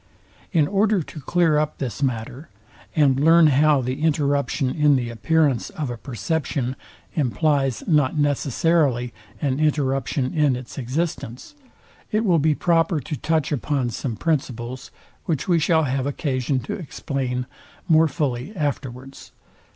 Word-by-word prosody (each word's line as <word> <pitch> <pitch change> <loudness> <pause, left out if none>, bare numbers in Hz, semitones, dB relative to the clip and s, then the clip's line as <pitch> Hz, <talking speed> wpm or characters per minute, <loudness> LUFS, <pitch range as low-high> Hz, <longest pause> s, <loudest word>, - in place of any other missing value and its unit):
In 155 -5 +3
order 200 -1 +2
to 150 - -10
clear 165 0 +2
up 150 0 -2
this 130 -2 -4
matter, 130 +3 -3 0.5
and 140 -4 +3
learn 165 +3 +6
how 150 0 +4
the 130 +3 -3
interruption 145 -3 +1
in 150 -1 +3
the 120 -3 -1
appearance 135 +4 +1
of 145 -5 -4
a - - -4
perception 130 +2 -2 0.4
implies 140 -1 0
not 150 -3 +2
necessarily 145 -3 +1 0.3
an 135 -1 0
interruption 135 -3 0
in 150 -5 +2
its 125 +3 -8
existence, 135 - -4 0.6
it 215 +2 +1
will 175 -5 +4
be 150 0 +2
proper 165 -1 +2
to 150 +3 -5
touch 155 0 0
upon 140 -3 -1
some 115 +1 -4
principles, 130 -3 -3 0.4
which 155 -5 -2
we 175 -3 +3
shall 160 +1 +3
have 135 -1 -1
occasion 130 -2 -1
to 120 - -5
explain 130 -6 -3 0.4
more 160 -1 +5
fully 140 - -3
afterwards. 135 -4 -5
145 Hz, 135 wpm, -23 LUFS, 130-155 Hz, 0.6 s, learn